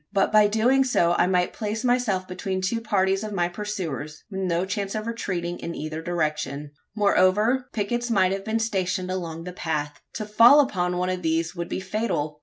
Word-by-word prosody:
But 195 -1 +2
by 210 -1 +6
doing 240 +6 +3
so 175 -10 +2
I - - +4
might 180 -1 +1
place 215 +1 -3
myself 245 -7 +1
between 185 +1 -3
two 230 +5 -1
parties 195 -2 +1
of 215 -1 -5
my 175 -3 +1
pursuers, 175 -6 -5
with 190 - -4
no 180 -1 0
chance 200 +1 -3
of 215 0 -3
retreating 180 -7 -3
in 170 - -5
either 155 +1 -5
direction. 150 -4 -2 0.2
Moreover, 210 +5 +3
pickets 240 +3 -2
might 190 -5 +3
have 195 0 -3
been 220 +2 -1
stationed 185 -4 -1
along 165 -3 -4
the 180 +1 -7
path. 150 -4 -3
To 215 - -4
fall 230 +7 +7
upon 180 -10 +1
one 180 +1 0
of 185 0 -3
these 165 0 -1
would 170 -1 -4
be - - -2
fatal. 185 -7 -2
190 Hz, 195 wpm, -25 LUFS, 175-215 Hz, 0.2 s, fall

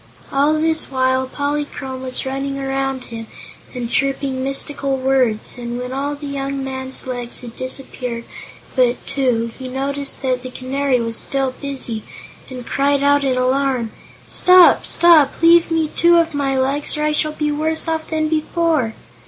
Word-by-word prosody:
All 285 +3 +3
this 315 0 +1
while 260 -1 +1
Polychrome 285 -2 -3
was 260 0 -4
running 275 +1 -3
around 270 -1 -2
him 225 -1 -6 0.5
and 245 -1 -3
chirping 270 +1 0
mystical 275 0 -1
words, 260 -4 0
and 240 0 -4
when 250 +1 -5
all 285 +2 -2
the 290 +1 -9
young 275 -1 -3
man's 265 0 -4
legs 245 -2 -4
had 235 -2 -9
disappeared 255 -2 -4 0.5
but 250 -1 +3
two 245 -5 0
he 260 - -6
noticed 275 +2 -2
that 255 -1 0
the 255 - -7
Canary 260 +1 -1
was 230 -1 -2
still 270 -1 -1
busy 265 -6 -2 0.5
and 250 -2 -8
cried 280 +1 +1
out 285 0 +4
in 260 -2 +1
alarm: 255 -2 +1 0.4
"Stop 365 -1 +6
stop! 325 -5 +5
Leave 335 0 +6
me 325 -1 +1
two 340 +2 +4
of 330 -1 +2
my 275 -2 0
legs, 275 +3 0
or 300 - -1
I 305 - +2
shall 305 0 0
be 300 -1 -1
worse 315 +2 -1
off 320 -1 -2
than 315 -1 0
before." 310 -5 0
270 Hz, 160 wpm, -19 LUFS, 255-290 Hz, 0.5 s, Stop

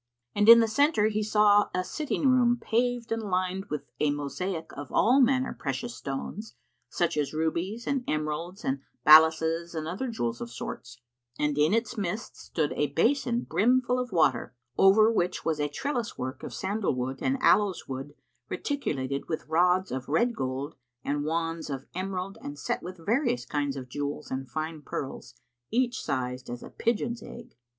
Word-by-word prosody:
And 205 +2 +3
in 230 0 +11
the 225 - +3
centre 220 -2 +3
he 215 0 -1
saw 210 -1 +4
a 185 - +1
sitting 290 +6 -1
room 245 -2 +4
paved 240 0 0
and 225 0 0
lined 185 -1 -1
with 150 -6 -4 0.2
a 150 - +2
mosaic 160 +4 -3
of 145 -1 -8
all 255 +5 +4
manner 260 +1 +2
precious 130 -4 -4
stones 135 - -6 0.3
such 175 - 0
as 150 0 -1
rubies 170 +8 -2
and 275 -2 0
emeralds 155 +5 -3
and 135 +1 0 0.3
balasses 160 +2 +6
and 155 -1 -3
other 190 +11 -3
jewels 120 - -3
of 120 - -5
sorts; 120 0 -7 0.4
and 150 -1 0
in 150 +2 +3
its 230 +1 0
midst 200 +3 -3
stood 155 -3 -2
a 150 -1 -1
basin[FN#51] 240 - +2
brimful 250 +2 +2
of 250 -1 -3
water, 135 -8 +2 0.2
over 215 +3 +6
which 180 -5 -1
was 160 -2 0
a 145 0 0
trellis 240 - -3
work 130 +1 -5
of - - -6
sandalwood 135 - -2
and 270 +1 +1
aloes 205 -7 +3
wood 135 +2 -6 0.3
reticulated 140 - -3
with 160 - -3
rods 180 +4 +2
of 130 +1 -4
red 235 +11 +2
gold 135 +2 -3 0.3
and 145 +1 -1
wands 165 0 -2
of 135 -1 -5
emerald 190 +2 -4
and 285 +2 -7
set 240 - -2
with 185 +1 -8
various 175 - 0
kinds 145 +1 -1
of 130 -2 -6
jewels 145 +3 -4
and 130 0 -4
fine 155 +3 -4
pearls, 130 -3 -6 0.3
each 245 +1 0
sized 125 0 -3
as 120 0 -6
a - - -10
pigeon's 235 0 -1
egg. 235 - -11
175 Hz, 170 wpm, -28 LUFS, 145-225 Hz, 0.4 s, in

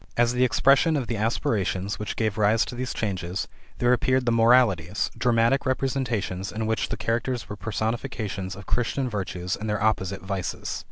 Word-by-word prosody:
As 120 0 +3
the 125 +1 +2
expression 135 +5 +4
of 135 - -1
the 115 - -2
aspirations 100 -3 -1
which 105 - -4
gave 110 -2 -1
rise 110 +2 +3
to - - -7
these 125 0 -3
changes, 95 -3 -3 0.3
there 125 0 +3
appeared 130 +1 +2
the 120 - +2
Moralities, 115 -6 +3
dramatic 120 +2 +2
representations 120 -8 -1
in 110 +1 -3
which 110 0 -1
the - - -3
characters 120 +1 -1
were 105 - -6
personifications 105 -2 -3
of 100 0 -10
Christian 125 +2 0
virtues 95 -4 -3
and 110 +1 -5
their 105 0 -1
opposite 100 -3 0
vices. 95 -2 -3
110 Hz, 170 wpm, -25 LUFS, 100-120 Hz, 0.3 s, expression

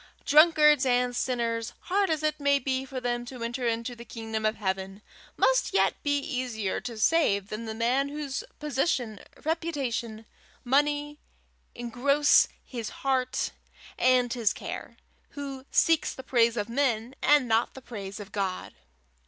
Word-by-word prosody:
Drunkards 300 -2 +6
and 250 -1 +2
sinners, 230 -3 -1
hard 395 +1 +1
as 310 -1 0
it 305 0 0
may 280 0 +3
be 265 -1 -2
for 265 -1 -5
them 240 -1 -2
to 245 -1 -7
enter 240 +1 -2
into 230 +2 -2
the 235 - -10
kingdom 220 -1 -3
of 215 - -1
heaven, 195 0 -3 0.3
must - - +2
yet 195 0 +4
be 285 0 +1
easier 250 -8 -3
to 235 -2 -6
save 215 -7 +2
than 215 +2 -5
the 220 0 -5
man 250 +5 +1
whose 285 -2 -4
position, 265 -6 -1 0.3
reputation, 270 -9 -2 0.4
money, 295 +3 +1 0.6
engross 260 +5 +3 0.2
his 235 -4 -5 0.2
heart 260 -2 0 0.5
and 250 -1 +3
his 230 -5 +1
care, - - -7 0.4
who 275 -1 -6
seeks 325 -2 +2
the 260 - -9
praise 235 -2 +2
of 205 -1 -1
men 235 -1 0
and 290 -4 +4
not 225 +1 +1
the - - -8
praise 200 -4 -7
of 205 0 -9
God. 195 -2 -3
250 Hz, 150 wpm, -27 LUFS, 225-285 Hz, 0.6 s, Drunkards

